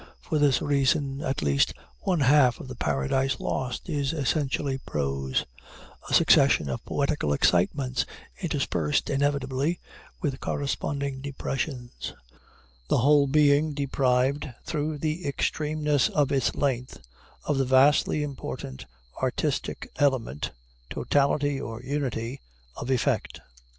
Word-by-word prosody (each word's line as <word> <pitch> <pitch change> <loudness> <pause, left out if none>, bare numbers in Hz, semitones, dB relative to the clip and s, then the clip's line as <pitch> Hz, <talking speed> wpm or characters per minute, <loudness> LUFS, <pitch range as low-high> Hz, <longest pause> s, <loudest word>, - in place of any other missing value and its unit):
For 155 - -1
this 145 -3 +3
reason, 140 0 +1
at 135 - -2
least 70 -1 +2 0.2
one 180 -5 0
half 130 -3 +5
of - - -8
the 130 - -6
Paradise 120 - 0
Lost 130 +4 -3
is 145 -3 -1
essentially 140 -2 0
prose 70 - -2 0.6
a - - -3
succession 70 - +5
of 65 - -4
poetical 140 - 0
excitements 125 - +2 0.3
interspersed, 150 -3 0
inevitably, 140 +2 0 0.4
with 140 -6 -2
corresponding 140 -1 -2
depressions 135 -2 -4 0.8
the - - +3
whole 140 +3 +5
being 145 +1 +3
deprived, 135 0 +1 0.2
through 150 -1 -2
the 155 +4 -2
extremeness 150 -1 0
of 145 -3 +1
its 135 -3 +1
length, 130 -3 -1 0.5
of 145 -2 0
the 135 - +2
vastly 140 +3 +4
important 130 - -6 0.3
artistic - - -2
element, 130 - 0 0.4
totality, 145 0 +1
or 115 -1 -6
unity, 130 -2 -3 0.3
of 120 - -6
effect. 130 -2 0
140 Hz, 115 wpm, -26 LUFS, 125-145 Hz, 0.8 s, half